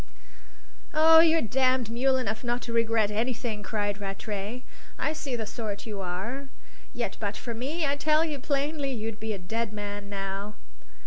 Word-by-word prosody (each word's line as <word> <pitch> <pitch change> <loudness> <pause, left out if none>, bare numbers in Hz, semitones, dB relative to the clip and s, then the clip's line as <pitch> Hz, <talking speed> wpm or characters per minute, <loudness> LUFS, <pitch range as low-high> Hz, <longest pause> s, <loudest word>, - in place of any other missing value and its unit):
"Oh, 320 +1 +9
you're 325 0 +5
damned 255 0 +2
mule 260 +3 +3
enough 220 -3 -2
not 240 0 0
to 235 - -4
regret 225 -2 +3
anything!" 225 0 -1
cried 205 0 -1
Rattray. 205 +4 -4 0.3
"I 305 - 0
see 285 -5 -3
the 225 -2 -2
sort 210 -2 -4
you 210 -3 -4
are; 225 +10 -4 0.4
yet - - -3
but - - -2
for 235 - -4
me, 285 +8 -1
I 280 0 +1
tell 310 +2 +4
you 300 -3 -3
plainly, 285 0 0
you'd 225 -3 -4
be 220 0 -2
a - - -3
dead 220 +4 -2
man 205 -1 -5
now." 195 +1 -3
230 Hz, 170 wpm, -28 LUFS, 205-270 Hz, 0.4 s, Oh